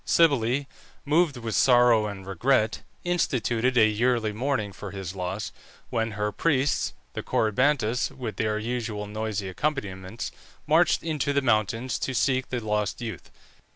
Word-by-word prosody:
Cybele, 140 -4 +3 0.4
moved 150 -1 +2
with 115 -2 -4
sorrow 120 -4 +5
and 100 -2 -7
regret, 110 +4 +1 0.2
instituted 125 -8 +1
a 110 - +7
yearly 110 0 +1
mourning 115 -3 -1
for 105 - -7
his 95 -2 -6
loss, 95 +3 -3 0.4
when 115 -1 -1
her 105 0 -1
priests, 140 +3 +1 0.2
the - - -4
Corybantes, 125 +1 +1
with 120 -5 -6
their 110 -1 0
usual 115 -2 -3
noisy 105 -2 -3
accompaniments, 100 -3 -3 0.3
marched 160 +3 +3
into 150 -3 -1
the 140 - +2
mountains 115 +1 +1
to 135 - -2
seek 130 0 +1
the 125 - -1
lost 105 -1 -1
youth. 115 -3 -6
115 Hz, 140 wpm, -26 LUFS, 105-130 Hz, 0.4 s, a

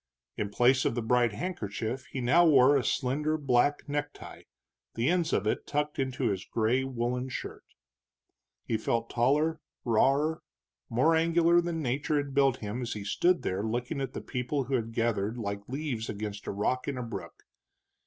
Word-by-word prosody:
In 105 - -2
place 125 +5 +3
of - - 0
the 120 - -2
bright 120 0 +3
handkerchief 115 - -4
he 130 - -5
now 145 +9 +5
wore 140 -4 +6
a 135 - +2
slender 150 +6 0
black 140 +1 +1
necktie, 145 0 -5 0.5
the 115 +3 0
ends 175 -2 +1
of 100 - +1
it 110 - -1
tucked 150 0 -2
into 130 -2 0
his 95 -1 -3
gray 115 +5 +1
woolen 125 0 -2
shirt. - - -6 1.0
He 115 - 0
felt 115 +1 -1
taller, 150 +7 +2 0.3
rawer, 140 +7 +2 0.5
more 130 +8 +3
angular 170 +1 +4
than 170 -2 -3
nature 140 +4 0
had 140 -1 -2
built 135 -2 +3
him 105 +4 -4
as 120 -1 -3
he 105 - -6
stood 175 - +2
there 95 +2 -1
looking 120 +6 -2
at 130 -1 -4
the - - -5
people 125 +3 -2
who 130 +2 -5
had 115 -3 0
gathered 115 -1 -1
like 100 -2 -5
leaves 130 -5 -3
against 105 -1 -5
a - - -1
rock 125 +6 -1
in 140 -2 -2
a 125 - -3
brook. 95 -8 -8
125 Hz, 175 wpm, -29 LUFS, 115-145 Hz, 1.0 s, wore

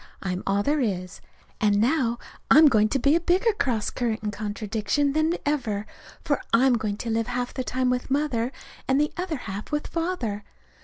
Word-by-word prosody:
I'm 185 -1 -2
all 200 +1 +2
there 295 +4 +1
is. 185 -8 -2 0.4
And 205 -2 +3
now 240 0 +2 0.3
I'm 315 +3 +8
going 215 -4 +3
to 275 - +1
be 280 +4 +3
a - - +4
bigger 370 +6 +2
cross 255 - -1
current 225 -3 -2
and 210 -1 -2
contradiction 215 +6 -1
than 310 +3 +2
ever, 235 -9 -1 0.4
for 285 - 0
I'm 255 +3 +5
going 215 -3 -1
to 230 +1 -4
live 225 0 0
half 245 0 -3
the 255 - -3
time 255 0 0
with 250 +1 -2
Mother 265 -4 0 0.4
and 265 +2 +3
the 300 0 +1
other 355 -4 -3
half 200 +5 -6
with 295 0 -1
Father. 325 - -3
245 Hz, 190 wpm, -25 LUFS, 215-290 Hz, 0.4 s, I'm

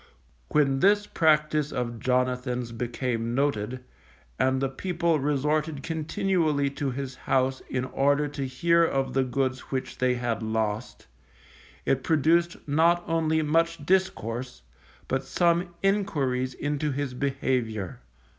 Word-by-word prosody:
When 135 -3 +2
this 205 +5 +4
practice 150 -3 +2
of 120 -2 -3
Jonathan's 125 0 0
became 120 0 -2
noted, 130 -3 -1 0.6
and 130 0 +2
the 135 - +1
people 170 +3 0
resorted 150 +1 0
continually 160 -3 0
to 140 0 -2
his 135 0 -4
house 130 0 0
in 130 0 -1
order 140 +3 +2
to 140 -2 -4
hear 170 +6 +3
of 135 -5 0
the 135 - +3
goods 130 0 -1
which 130 -1 -4
they 125 0 +2
had 120 -2 -2
lost, 110 +1 -2 0.8
it 135 - +2
produced 165 +4 +2
not 165 +4 +3
only 160 -1 +1
much 165 0 +1
discourse, 125 - -1 0.4
but 135 +1 -1
some 170 +5 +1
enquiries 140 -11 0
into 150 +1 -1
his 140 -1 -3
behaviour. 125 -7 -2
135 Hz, 125 wpm, -27 LUFS, 125-160 Hz, 0.8 s, this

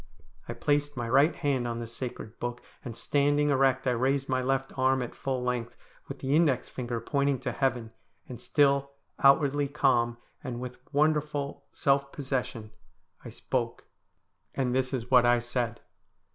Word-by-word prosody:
I - - -2
placed 145 -1 0
my 120 -2 -2
right 140 +7 +4
hand 135 -4 0
on 115 -1 -3
the 120 - -4
sacred 115 -1 -7
book, 120 0 -3 0.2
and 115 -2 -7
standing 145 +3 +2
erect 135 -1 +2
I 125 - +3
raised 135 +3 +1
my 130 -1 0
left 135 +1 -1
arm 130 0 +2
at 120 - -7
full 130 -2 -3
length 120 -1 -2 0.3
with - - -7
the 135 +2 0
index 155 -6 +2
finger 120 -2 -4
pointing 140 +3 0
to - - -2
heaven, 120 -4 -1 0.4
and 125 - -8
still, 140 -1 +2 0.3
outwardly 140 0 +4
calm, 120 -5 +2 0.3
and 125 -4 -4
with 125 0 -7
wonderful 150 -1 0
self 140 0 +1
possession 125 -6 -4 0.5
I - - -8
spoke, - - -3 0.7
and 125 -2 0
this 130 0 0
is 125 -2 -4
what 125 -2 +7
I 120 0 +5
said. 120 -1 -2
130 Hz, 160 wpm, -28 LUFS, 120-140 Hz, 0.7 s, what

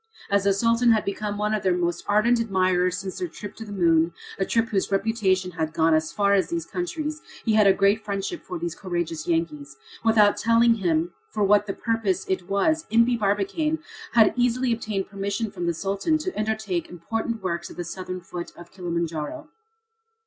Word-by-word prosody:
As 200 0 +2
the 200 - +5
Sultan 230 +3 +3
had 215 - 0
become 205 +1 -3
one 210 +1 0
of 215 - 0
their 185 -2 +2
most 175 -1 -1
ardent 225 +4 +3
admirers 185 -4 +1
since 190 -1 -5
their 360 - -2
trip 205 - -9
to 225 - -7
the 205 - -10
moon, 165 -3 +3 0.3
a 195 - +1
trip 230 0 +1
whose 195 -1 -1
reputation 195 -3 +1
had 160 -2 -3
gone 160 0 +3
as 155 0 +1
far 200 -1 +2
as 195 -2 +2
these 340 -1 -2
countries, 320 -3 -4 0.2
he 220 - +2
had 215 -2 +5
a - - +8
great 200 +3 +2
friendship 200 - -3
for 360 - -6
these 340 0 -3
courageous 175 -4 -4
Yankees. 150 -5 -2 0.3
Without 215 -2 +5
telling 230 +1 +4
him 175 -5 0 0.2
for 210 - -1
what 205 +1 +4 0.2
purpose 220 -5 0
it 185 -1 -2
was, 315 +12 +1
Impey 230 +2 +4
Barbicane 210 - 0 0.4
had 225 -2 +6
easily 245 0 +2
obtained 215 -4 -3
permission 200 +2 -3
from 175 -4 -4
the 170 - +1
Sultan 200 - 0
to 370 +4 -4
undertake 215 -5 -2
important 225 +5 -4
works 170 -2 -2
at - - -12
the 175 - -3
southern 185 +1 -6
foot 175 0 -7
of 175 0 -12
Kilimanjaro. 170 - -4
200 Hz, 190 wpm, -25 LUFS, 180-230 Hz, 0.4 s, a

